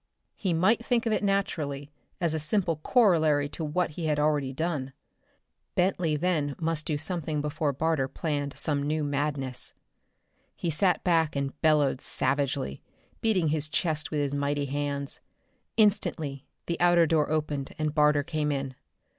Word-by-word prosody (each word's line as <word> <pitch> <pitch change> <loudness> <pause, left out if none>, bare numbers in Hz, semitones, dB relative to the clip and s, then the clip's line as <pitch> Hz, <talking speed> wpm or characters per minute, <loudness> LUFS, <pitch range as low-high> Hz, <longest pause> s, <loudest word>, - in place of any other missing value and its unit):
He 190 - -1
might 190 +8 +3
think 240 -1 +1
of 225 - +1
it 215 - 0
naturally, 150 -8 -1 0.3
as 170 -3 0
a 160 - -1
simple 165 +1 +1
corollary 155 - +3
to 160 - -5
what 160 +3 0
he 160 +1 -4
had 150 -1 +1
already 150 -3 +1
done. 140 -2 -3 0.8
Bentley 180 -4 +1
then 150 -4 0
must 160 -2 -1
do 150 - 0
something 160 -1 -2
before 150 0 -1
Barter 150 -1 0
planned 145 -1 -3
some 145 -2 +1
new 150 +2 -1
madness. 140 -3 -3 0.8
He 170 - -2
sat 180 +2 +2
back 165 -4 +2
and 140 -1 -2
bellowed 150 -4 +3
savagely, 135 - -1 0.4
beating 190 -8 +2
his 150 0 -1
chest 155 -1 0
with 150 -2 -1
his 140 -1 -1
mighty 145 0 0
hands. 140 0 -3 0.6
Instantly 160 -10 +1 0.2
the 170 - -3
outer 175 -1 +5
door 155 -2 +2
opened 150 -3 -2
and 155 -1 -1
Barter 150 -1 +4
came 150 -1 -1
in. 135 -2 -3
150 Hz, 155 wpm, -28 LUFS, 145-170 Hz, 0.8 s, outer